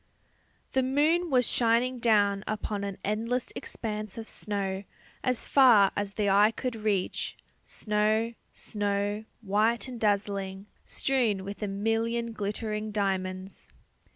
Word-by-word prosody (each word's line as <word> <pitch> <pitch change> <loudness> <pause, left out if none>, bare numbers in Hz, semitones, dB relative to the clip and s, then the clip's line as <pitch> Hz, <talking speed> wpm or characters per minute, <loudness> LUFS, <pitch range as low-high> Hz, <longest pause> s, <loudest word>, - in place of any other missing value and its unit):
The 265 - +2
moon 305 +7 +2
was 250 -3 +3
shining 240 +2 +2
down 205 -4 +3
upon 210 -1 -3
an 200 -1 -4
endless 230 +4 -1
expanse 215 -2 -5
of 225 -1 -6
snow 195 -2 -2 0.4
as 255 -2 +1
far 235 -8 +6
as 200 -1 -3
the 210 -1 0
eye 200 +2 +6
could 245 +2 -4
reach, 210 -4 -1 0.3
snow, 215 +2 0 0.2
snow, 205 0 -2 0.2
white 215 +3 +1
and 250 -2 -7
dazzling, 200 -2 -1 0.2
strewn 235 -8 +1
with 200 +2 -7
a 210 - -1
million 225 +3 -1
glittering 215 +1 -3
diamonds. 190 -2 -2
210 Hz, 125 wpm, -28 LUFS, 200-230 Hz, 0.4 s, far